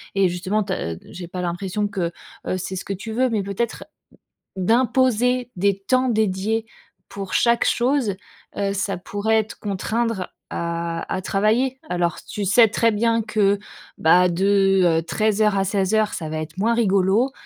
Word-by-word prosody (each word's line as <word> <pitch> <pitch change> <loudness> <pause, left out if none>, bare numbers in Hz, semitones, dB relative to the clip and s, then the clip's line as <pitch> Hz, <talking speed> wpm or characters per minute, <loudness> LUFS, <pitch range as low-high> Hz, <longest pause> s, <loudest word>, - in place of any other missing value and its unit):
et 195 -2 +3
justement 185 +4 -1
tu 190 -1 -3
as 85 - -3 0.2
j'ai 175 -1 -8
pas 180 +1 -5
l'impression 185 +4 -2
que, 180 -4 -2 0.4
heu, 185 - 0
c'est 190 +1 -5
ce - - -6
que 200 - -3
tu 210 +4 -7
veux. 255 +2 +2
Mais 210 -3 -1
peut-être 200 +4 -3 0.7
d'imposer 250 +3 +2
des 200 +1 +1
temps 255 +5 +1
dédiés 220 0 0 0.4
pour 195 -1 -6
chaque 235 0 +3
chose, 245 -4 +1 0.4
heu, 200 -1 0
ça 200 -1 -1
pourrait 215 +3 0
te 220 - -11
contraindre 220 +2 -1 0.3
à 170 0 -3 0.2
à 185 - -2
travailler. 225 +8 +1
Alors, 175 -1 -1
tu 210 -2 -5
sais 220 +4 +6
très 230 +2 +2
bien 230 +1 +1
que 205 -2 +2 0.4
bah, 180 +3 +5
de, 195 +1 +3 0.2
heu, - - -8
13:00 210 +2 +1
à 195 - +2
16:00 205 +2 +1
ça 160 - -4
va 155 - -4
être 155 +2 -7
moins 230 +3 +2
rigolo, 205 +3 +2
200 Hz, 165 wpm, -22 LUFS, 185-225 Hz, 0.7 s, sais